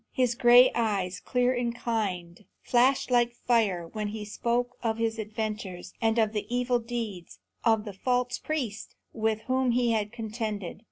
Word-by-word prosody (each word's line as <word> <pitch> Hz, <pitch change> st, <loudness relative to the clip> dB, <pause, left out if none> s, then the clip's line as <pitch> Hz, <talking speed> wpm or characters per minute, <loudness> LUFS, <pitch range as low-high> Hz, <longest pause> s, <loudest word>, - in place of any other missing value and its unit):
His 250 Hz, -2 st, +1 dB
gray 245 Hz, +1 st, +7 dB
eyes, 195 Hz, -5 st, -1 dB
clear 250 Hz, 0 st, +1 dB
and 240 Hz, -1 st, -1 dB
kind, 195 Hz, -6 st, -3 dB, 0.2 s
flashed 255 Hz, +2 st, +3 dB
like 240 Hz, -1 st, +3 dB
fire 215 Hz, -9 st, +1 dB
when 210 Hz, +4 st, -4 dB
he 210 Hz, 0 st, -5 dB
spoke 240 Hz, +3 st, -1 dB
of 225 Hz, -2 st, -1 dB
his 225 Hz, 0 st, -1 dB
adventures, 215 Hz, -4 st, -5 dB
and 225 Hz, 0 st, +2 dB
of 220 Hz, -1 st, +2 dB
the 210 Hz, -, -3 dB
evil 245 Hz, 0 st, +1 dB
deeds 225 Hz, -6 st, -5 dB, 0.3 s
of 225 Hz, -2 st, +3 dB
the 205 Hz, -, -6 dB
false 245 Hz, +5 st, 0 dB
priests 245 Hz, -10 st, -4 dB, 0.2 s
with 220 Hz, -1 st, 0 dB
whom 260 Hz, +1 st, 0 dB
he 240 Hz, -1 st, +2 dB
had 210 Hz, -2 st, 0 dB
contended. 220 Hz, -5 st, -4 dB
225 Hz, 160 wpm, -28 LUFS, 210-245 Hz, 0.3 s, gray